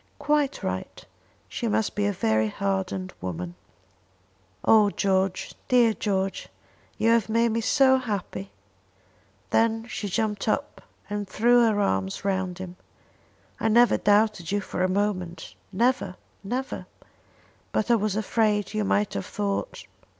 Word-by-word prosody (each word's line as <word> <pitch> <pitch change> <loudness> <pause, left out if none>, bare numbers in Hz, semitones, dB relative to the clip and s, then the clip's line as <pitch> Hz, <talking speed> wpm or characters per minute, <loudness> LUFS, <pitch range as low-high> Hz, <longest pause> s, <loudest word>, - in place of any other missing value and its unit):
"Quite 290 -1 0
right. - - -4 0.4
She 235 - -3
must 220 0 0
be 205 0 0
a - - +1
very 110 - +1
hardened 190 - -2
woman." 90 -1 -4 1.1
"Oh 215 -2 +6
George, 190 -2 0
dear 240 -3 +4
George! 195 -2 -2 0.5
You 225 - +3
have 230 -2 +2
made 230 +1 +3
me 230 +1 0
so 265 +2 +4
happy!" 195 - -4 1.0
Then 225 0 +2
she 210 - -4
jumped 210 +1 -1
up 280 +6 -1 0.3
and 205 -1 -3
threw 240 +4 +4
her 210 -1 0
arms 95 - -1
round 190 -2 -1
him. 185 -1 -8 0.8
"I - - 0
never 235 +2 +5
doubted 205 -4 +2
you 205 - +1
for 190 - -4
a 185 - +2
moment 185 -4 -2 0.2
never, 230 -2 +1 0.3
never; 255 +6 -4 0.8
but 220 - 0
I - - +6
was 210 -2 0
afraid 215 -1 +1
you 215 0 0
might 205 +1 +1
have - - -4
thought 205 - -3
205 Hz, 135 wpm, -26 LUFS, 190-225 Hz, 1.1 s, Oh